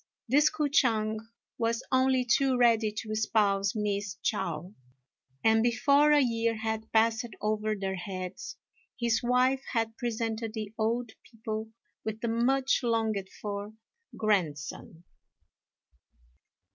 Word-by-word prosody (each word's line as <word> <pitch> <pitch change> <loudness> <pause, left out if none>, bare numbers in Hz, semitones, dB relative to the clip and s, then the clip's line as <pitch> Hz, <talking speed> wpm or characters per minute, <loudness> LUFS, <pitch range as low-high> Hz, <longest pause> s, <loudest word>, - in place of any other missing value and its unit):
This 290 +5 +5
K'o 305 -1 -1
ch'ang 220 -7 +2 0.4
was 230 +1 0
only 260 -1 +3
too 260 +2 +3
ready 230 -3 +4
to 215 +1 -6
espouse 205 -2 +1
Miss 205 -2 -2
Chao; 175 +1 -2 0.7
and 225 0 +4
before 280 +6 +4
a 295 - +6
year 230 -3 +1
had 220 0 -4
passed 225 +2 +2
over 215 0 -1
their 190 -1 -3
heads 185 0 -6 0.4
his 235 -2 +1
wife 255 +2 +2
had 225 -2 0
presented 225 -2 -3
the 215 -1 -5
old 230 +1 -1
people 220 -1 -6 0.3
with 220 0 -4
the 235 - -1
much 260 +4 +2
longed 220 -5 0
for 205 0 -4 0.4
grandson. 170 -5 -2
225 Hz, 120 wpm, -29 LUFS, 210-240 Hz, 0.7 s, a